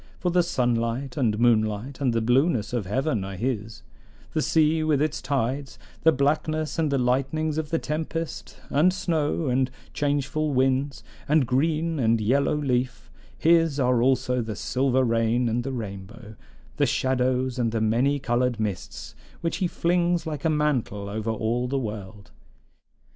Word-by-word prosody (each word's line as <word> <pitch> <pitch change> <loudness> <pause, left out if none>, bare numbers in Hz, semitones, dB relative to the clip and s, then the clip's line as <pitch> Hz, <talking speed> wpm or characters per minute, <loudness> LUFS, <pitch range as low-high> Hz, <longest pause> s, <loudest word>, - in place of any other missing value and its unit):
For 180 - -1
the 180 +1 +4
sunlight 125 -4 -1
and 115 -7 +1
moonlight 115 +3 +1
and 130 -3 +2
the 115 0 0
blueness 125 - +2
of 115 -7 -2
heaven 120 -1 0
are 95 0 -6
his; 115 0 -3 0.5
the 155 - +1
sea 160 0 +2
with 155 -3 +2
its 155 +1 -1
tides; 135 -1 -2 0.2
the 160 - +6
blackness 155 +3 0
and 155 -3 +1
the 140 - +2
lightnings 135 +5 0
of 155 -2 -4
the 165 - +1
tempest, 160 +1 -4
and 155 +6 +4
snow, 165 -4 -1
and 130 0 +1 0.2
changeful 145 +1 -1
winds, 135 +2 +1 0.3
and 150 -2 +4
green 155 +5 0
and 115 -2 +2
yellow 135 +8 +2
leaf; 125 -4 -2 0.3
his 165 -3 +3
are 125 -2 +2
also 125 -1 +2
the 110 -2 -4
silver 130 +3 +1
rain 115 +1 +1
and 120 +1 0
the 135 - -3
rainbow, 105 -1 -7 0.4
the - - +3
shadows 130 -1 0
and 115 -2 +1
the 115 - -1
many 120 +6 +2
colored 125 -2 0
mists, 105 -4 -4 0.3
which 165 - -1
he 185 - 0
flings 175 0 +1
like 150 -3 -4
a 160 - +2
mantle 135 -10 0
over 110 +2 -3
all 115 +3 -1
the 135 +2 -1
world. 105 -4 -6
130 Hz, 160 wpm, -25 LUFS, 115-150 Hz, 0.5 s, the